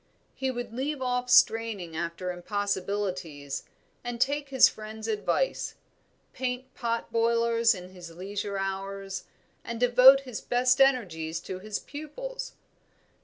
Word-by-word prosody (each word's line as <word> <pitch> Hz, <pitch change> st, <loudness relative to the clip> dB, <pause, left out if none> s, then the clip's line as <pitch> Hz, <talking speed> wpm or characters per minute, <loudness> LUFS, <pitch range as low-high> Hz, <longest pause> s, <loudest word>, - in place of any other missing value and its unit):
He 265 Hz, 0 st, -2 dB
would 245 Hz, -2 st, -4 dB
leave 275 Hz, +4 st, -2 dB
off 250 Hz, -1 st, -1 dB
straining 220 Hz, -9 st, +3 dB
after 170 Hz, +2 st, -3 dB
impossibilities, 185 Hz, -6 st, -3 dB, 0.4 s
and 240 Hz, -1 st, -4 dB
take 285 Hz, +2 st, +1 dB
his 265 Hz, -1 st, +7 dB
friends' 220 Hz, 0 st, -7 dB
advice 220 Hz, -, 0 dB, 0.6 s
paint 255 Hz, 0 st, -4 dB
pot 230 Hz, -1 st, -2 dB
boilers 230 Hz, 0 st, +3 dB
in 180 Hz, 0 st, -9 dB
his 180 Hz, -2 st, -10 dB
leisure 200 Hz, +4 st, -4 dB
hours, 195 Hz, 0 st, -4 dB, 0.4 s
and 235 Hz, 0 st, -5 dB
devote 250 Hz, +3 st, +8 dB
his 250 Hz, -5 st, -7 dB
best 250 Hz, +2 st, +2 dB
energies 175 Hz, -12 st, +2 dB
to 185 Hz, -1 st, -6 dB
his 210 Hz, +2 st, -4 dB
pupils. -, -, -7 dB
225 Hz, 120 wpm, -28 LUFS, 190-250 Hz, 0.6 s, devote